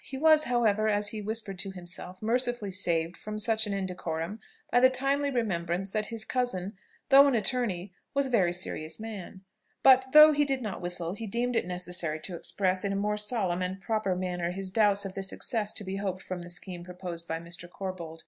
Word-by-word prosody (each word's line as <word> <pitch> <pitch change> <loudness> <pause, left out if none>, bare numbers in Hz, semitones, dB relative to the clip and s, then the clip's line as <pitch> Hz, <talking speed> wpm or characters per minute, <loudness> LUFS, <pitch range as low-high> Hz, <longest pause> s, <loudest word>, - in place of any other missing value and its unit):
He 270 - -7
was, 310 +1 +5
however, 220 -3 +2
as 205 0 +1
he 215 0 -5
whispered 210 -3 -4
to 195 - -3
himself, 185 +1 -7
mercifully 240 -2 +1
saved 170 -2 -1
from 215 0 -6
such 220 0 +1
an 205 - -2
indecorum 180 0 -3 0.3
by 245 - +5
the 255 +1 +7
timely 275 +2 0
remembrance 190 -6 -1
that 215 0 -1
his 225 -2 -4
cousin, 210 -7 -1 0.3
though 280 +1 +9
an 275 - +2
attorney, 210 -6 -1 0.2
was 280 0 +3
a 260 - -4
very 190 -7 +3
serious 170 -2 -4
man; 210 -4 -7 0.4
but, 260 -1 +7
though 305 +1 +10
he 295 0 +3
did 270 -3 -1
not 205 -4 -4
whistle, 175 -1 -2
he 220 +2 -6
deemed 240 +4 -1
it 230 - +1
necessary 180 -3 -1
to 180 - -6
express 185 +2 -1
in 200 - 0
a - - -1
more 210 +1 0
solemn 210 -4 0
and 185 +1 -3
proper 215 -1 -1
manner 180 -1 -2
his 190 +1 -5
doubts 205 -1 +3
of 190 - -5
the 195 - -4
success 210 +2 0
to 210 - -4
be 190 0 -4
hoped 190 -2 -3
from 185 -1 -5
the 175 - -9
scheme 175 0 -5
proposed 175 -1 -7
by 165 - -2
Mr. 175 +1 -7
Corbold. 175 -4 -6
195 Hz, 205 wpm, -29 LUFS, 180-230 Hz, 0.4 s, though